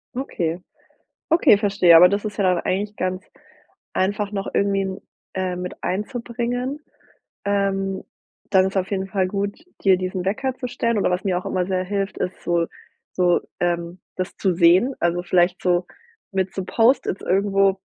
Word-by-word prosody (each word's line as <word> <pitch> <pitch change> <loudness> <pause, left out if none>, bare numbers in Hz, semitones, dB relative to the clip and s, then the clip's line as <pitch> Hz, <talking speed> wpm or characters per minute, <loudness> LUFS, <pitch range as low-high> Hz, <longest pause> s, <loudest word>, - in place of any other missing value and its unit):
Okay. 175 -10 -2 0.7
Okay, 315 -10 +5
verstehe, 195 -5 +5
aber 180 +2 +9
das 200 +3 -1
ist 210 -1 -4
ja 200 - 0
dann 180 -2 +3
eigentlich 205 +3 -2
ganz 185 0 -2 0.7
einfach 205 +2 0
noch 195 -1 -3
irgendwie, 195 -1 +1 0.4
äh, 185 -1 -2
mit 180 0 -7
einzubringen. 245 +6 -3 0.7
Ähm, 195 -1 0 0.5
dann 190 -1 +4
ist 190 +1 -2
auf 190 0 -1
jeden 190 -1 -1
Fall 190 -1 0
gut, 200 +1 -2 0.3
dir 190 -2 +5
diesen 185 0 -3
Wecker 255 +7 -1
zu 255 -1 -5
stellen 235 -2 -1
oder 195 - +1
was 180 0 -1
mir 185 -3 +1
auch 180 - -5
immer 185 -1 -1
sehr 185 -1 0
hilft, 195 +1 -3
ist 180 - -4
so 170 -1 +1 0.5
so 180 -1 +3 0.2
ähm, 175 0 -1 0.2
das 185 0 -4
zu 190 -2 +1
sehen, 185 +10 +4
also, 175 +1 +1
vielleicht 175 0 +2
so 180 -1 +2 0.5
mit 190 -1 -1
so 190 - -2
Post-its 225 -1 +2
irgendwo 195 0 +2
190 Hz, 165 wpm, -22 LUFS, 180-205 Hz, 0.7 s, aber